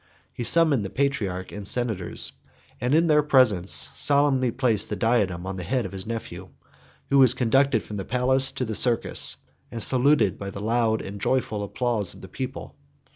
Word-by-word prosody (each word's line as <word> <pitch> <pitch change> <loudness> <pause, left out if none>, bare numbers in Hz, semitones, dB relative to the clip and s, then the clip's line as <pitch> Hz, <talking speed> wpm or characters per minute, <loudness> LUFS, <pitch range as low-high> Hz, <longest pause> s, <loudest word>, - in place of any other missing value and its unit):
He 120 - -6
summoned 145 -2 +4
the 95 - -5
patriarch 105 -10 -3
and 100 -1 -7
senators; 110 -8 -1 0.5
and 125 +4 0
in 165 +2 +3
their 150 -2 +3
presence 125 -10 +3
solemnly 140 -3 +2
placed 120 -3 0
the 105 - -3
diadem 100 -6 -1
on 95 0 -6
the 90 - -6
head 120 +6 -2
of 95 - -7
his 95 +1 -7
nephew, 95 -6 -7 0.6
who 140 - +4
was 130 -2 +6
conducted 130 -1 +1
from 105 - -8
the 95 - -4
palace 130 +2 +1
to 130 -2 -3
the 110 - -5
circus, 120 +2 +3 0.3
and 115 - -7
saluted 130 -6 +2
by 100 - -6
the 100 - -8
loud 110 +1 -1
and 100 +1 -9
joyful 110 -5 -1
applause 105 -1 -2
of - - -15
the 95 - -10
people. 130 +7 -7
115 Hz, 180 wpm, -24 LUFS, 100-130 Hz, 0.6 s, was